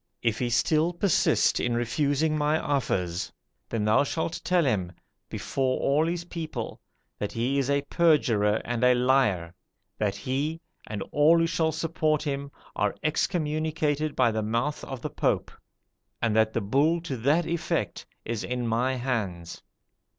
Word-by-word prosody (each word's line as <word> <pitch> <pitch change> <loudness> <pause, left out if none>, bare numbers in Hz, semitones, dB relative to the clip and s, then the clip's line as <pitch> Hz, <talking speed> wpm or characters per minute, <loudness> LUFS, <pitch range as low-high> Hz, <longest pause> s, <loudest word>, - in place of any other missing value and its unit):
If 115 -1 +1
he 125 - 0
still 155 +7 +2
persist 175 0 +2
in 120 -1 0
refusing 145 +6 +1
my 150 +1 +2
offers, 95 - -1 0.4
then 110 -2 -1
thou 110 +5 +4
shalt 160 +3 -3
tell 180 -3 +2
him, 95 -9 0 0.4
before 130 -1 -1
all 150 +4 +2
his 175 0 -2
people, 160 -9 -5 0.4
that 105 - -2
he 125 +5 0
is 135 0 -1
a 140 0 +2
perjurer 120 -11 +3
and 120 0 -2
a 125 0 +6
liar; 125 -10 +2 0.5
that 100 -2 0
he, 140 +9 -2 0.3
and 105 -2 -4
all 150 +3 +5
who 165 - +3
shall 165 -1 +1
support 155 -1 0
him, 140 -2 -3 0.3
are 105 -1 0
excommunicated 155 -2 0
by 125 -3 +3
the 110 0 -1
mouth 115 +7 -1
of 135 -3 -7
the - - -3
Pope; - - 0 0.7
and 115 -2 0
that 110 0 +3
the 115 - 0
bull 140 +11 +2
to 145 -5 -4
that 145 +9 +2
effect 170 0 -2 0.2
is 115 -2 -3
in 125 -1 -2
my 125 +4 +1
hands.' 105 -10 -3
135 Hz, 155 wpm, -27 LUFS, 115-155 Hz, 0.7 s, a